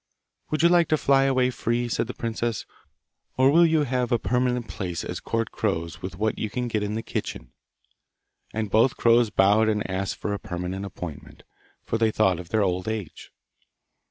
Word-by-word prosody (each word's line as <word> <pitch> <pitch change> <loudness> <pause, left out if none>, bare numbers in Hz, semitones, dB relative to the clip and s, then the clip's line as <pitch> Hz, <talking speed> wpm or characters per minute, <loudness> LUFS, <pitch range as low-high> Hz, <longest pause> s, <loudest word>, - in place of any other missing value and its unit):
'Would 155 +1 0
you 170 - +7
like 170 -2 +4
to 155 - +2
fly 135 -1 +3
away 130 -2 +2
free?' 120 0 -1
said 115 - -1
the 125 - -6
princess, 115 -1 -3 0.7
'or 130 +1 +5
will 170 +2 +6
you 160 -2 +2
have 125 -3 -1
a 120 - +4
permanent 125 -1 0
place 90 -4 -4
as - - -5
court 115 -1 -2
crows 85 -6 -2
with 95 0 -6
what 110 +1 -1
you 110 - -2
can 125 +3 -3
get 110 -3 -1
in 105 +1 -2
the 115 - -3
kitchen?' - - -5 1.0
And 110 -2 -3
both 115 +4 +3
crows 115 -1 +4
bowed 105 +3 +4
and 105 -1 -1
asked 95 0 -2
for 105 - -3
a 100 - -3
permanent 90 +2 -4
appointment, 85 -6 -9 0.4
for 115 - -2
they 115 -1 +3
thought 95 -5 +2
of 90 -1 -9
their 110 0 +2
old 90 0 -1
age. 110 -7 -5
110 Hz, 190 wpm, -25 LUFS, 95-125 Hz, 1.0 s, you